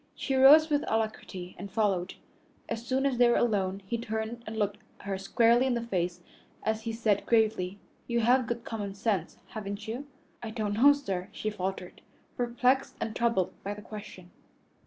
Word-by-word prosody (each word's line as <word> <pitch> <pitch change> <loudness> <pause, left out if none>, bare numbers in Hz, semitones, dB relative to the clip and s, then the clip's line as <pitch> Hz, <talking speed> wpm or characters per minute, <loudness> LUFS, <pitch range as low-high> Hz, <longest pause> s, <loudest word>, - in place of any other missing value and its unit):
She 270 - -2
rose 295 +4 +7
with 295 0 +2
alacrity 215 -5 -3
and 200 +2 -6
followed. 195 -4 0 0.5
As 225 - -4
soon 260 +2 0
as 260 -3 +1
they 245 -1 +6
were 240 - +4
alone, 195 -4 +1
he 230 +4 -2
turned 220 +1 -4
and 220 +1 -5
looked 205 -1 -1 0.2
her 200 -1 -3
squarely 235 +5 +3
in 250 - +1
the 235 - -2
face 180 -5 -2 0.4
as 220 0 0
he 225 0 -3
said 225 -3 0
gravely, 215 -5 +2 0.3
"You 235 -1 +1
have 245 +1 +3
good 235 0 -3
common 205 -3 -4
sense, 200 -5 -1
haven't 205 -1 -6
you?" 250 +6 -5 0.3
"I 230 - -5
don't 215 -2 -2
know, 260 +7 +7
sir," 195 -11 -4
she 215 - -3
faltered, 190 -2 -5 0.3
perplexed 250 +2 +1
and 220 - -3
troubled 230 -6 +1
by 205 +1 -3
the 210 - -11
question. 200 -4 -10
220 Hz, 180 wpm, -29 LUFS, 200-240 Hz, 0.5 s, rose